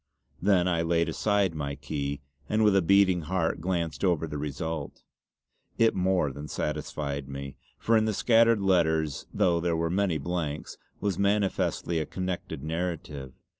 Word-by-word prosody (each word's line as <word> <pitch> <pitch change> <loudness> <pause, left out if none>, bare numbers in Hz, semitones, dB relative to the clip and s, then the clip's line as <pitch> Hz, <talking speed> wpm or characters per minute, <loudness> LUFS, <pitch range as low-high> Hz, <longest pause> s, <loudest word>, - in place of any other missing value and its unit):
Then 90 -2 +3
I 85 -2 +1
laid 85 0 +1
aside 100 -4 +1
my 70 -2 -3
key, 70 -1 -4 0.3
and 110 +1 +2
with 105 -2 +5
a 95 - +5
beating 95 0 +4
heart 80 0 -1
glanced 85 -2 -2
over 85 -4 +2
the 75 -2 -5
result. 75 +1 -4 0.7
It 115 0 +4
more 90 -5 +1
than 75 +3 -7
satisfied 70 -1 -3
me, 70 0 -6 0.2
for 115 - +2
in 110 -1 +4
the 110 - 0
scattered 115 -1 +4
letters 80 -6 +1
though 85 -2 +2
there 85 -1 0
were 85 0 0
many 95 -3 +1
blanks, 75 -1 -4 0.2
was 100 -1 -1
manifestly 100 -4 +1
a 80 - -3
connected 90 -6 -4
narrative. 80 -5 -4
85 Hz, 155 wpm, -28 LUFS, 75-95 Hz, 0.7 s, with